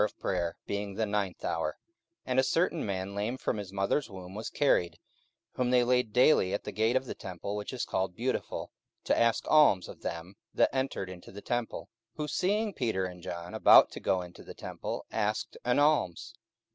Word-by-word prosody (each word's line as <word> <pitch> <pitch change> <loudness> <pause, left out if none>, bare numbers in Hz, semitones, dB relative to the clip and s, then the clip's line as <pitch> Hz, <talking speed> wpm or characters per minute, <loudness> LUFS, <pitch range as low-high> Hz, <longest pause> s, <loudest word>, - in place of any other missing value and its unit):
44:003:002 100 0 -2 0.5
And 130 0 +1
a - - +5
certain 165 +4 +1
man 95 -1 -3
lame 105 +5 -2
from 125 - -2
his 100 -3 -6
mother's 100 +7 0
womb 95 -2 -9
was 110 +2 -5
carried, 90 - +2 0.5
whom 125 -1 -1
they 125 -1 +5
laid 125 -2 +2
daily 125 -6 +4
at - - -4
the - - -5
gate 110 +3 +1
of 130 0 +1
the - - -5
temple 95 +2 -6
which 105 0 -4
is 130 - -3
called 95 -1 -2
Beautiful, 125 +3 -3 0.3
to - - +2
ask 115 -1 +2
alms 145 -12 +5
of - - -11
them 85 +4 -6 0.2
that - - +3
entered 130 -7 -1
into 90 -1 -10
the 100 +1 -10
temple; 120 -1 -2
44:003:003 - - -18 0.3
Who 150 -1 -3
seeing 205 +7 0
Peter 110 - -1
and 90 -1 -7
John 85 0 -6
about - - +7
to - - -7
go 95 -1 0
into 90 0 -12
the - - -10
temple - - -5
asked 105 -1 -1
an 125 0 +2
alms. 145 - +2
105 Hz, 185 wpm, -30 LUFS, 95-125 Hz, 0.5 s, about